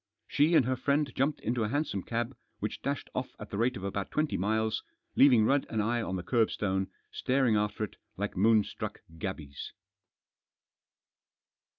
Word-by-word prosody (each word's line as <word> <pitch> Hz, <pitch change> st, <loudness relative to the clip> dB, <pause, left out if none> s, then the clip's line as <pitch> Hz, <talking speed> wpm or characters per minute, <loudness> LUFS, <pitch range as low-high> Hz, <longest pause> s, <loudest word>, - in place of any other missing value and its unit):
She 150 Hz, +4 st, +3 dB
and 130 Hz, -, +6 dB
her 130 Hz, +1 st, +1 dB
friend 140 Hz, +1 st, +1 dB
jumped 140 Hz, +3 st, 0 dB
into 120 Hz, 0 st, 0 dB
a 105 Hz, -, 0 dB
hansom 140 Hz, -7 st, -1 dB
cab, 120 Hz, +5 st, -2 dB, 0.2 s
which -, -, -4 dB
dashed -, -, -3 dB
off -, -, -3 dB
at -, -, -9 dB
the -, -, -3 dB
rate 125 Hz, +1 st, +2 dB
of 95 Hz, -, -8 dB
about 100 Hz, 0 st, -2 dB
twenty 155 Hz, -1 st, 0 dB
miles, 110 Hz, +3 st, +1 dB, 0.3 s
leaving 125 Hz, -6 st, +7 dB
Rudd 135 Hz, +3 st, +2 dB
and 110 Hz, -, -1 dB
I 120 Hz, +3 st, +1 dB
on 95 Hz, -, -2 dB
the 90 Hz, -, -3 dB
kerbstone, 100 Hz, -5 st, +1 dB, 0.2 s
staring 130 Hz, -3 st, +2 dB
after 105 Hz, +1 st, 0 dB
it 105 Hz, -, -5 dB, 0.2 s
like 105 Hz, +1 st, -2 dB
moonstruck 105 Hz, +2 st, +2 dB, 0.2 s
gabies. 75 Hz, -8 st, -5 dB
115 Hz, 165 wpm, -30 LUFS, 100-130 Hz, 0.3 s, leaving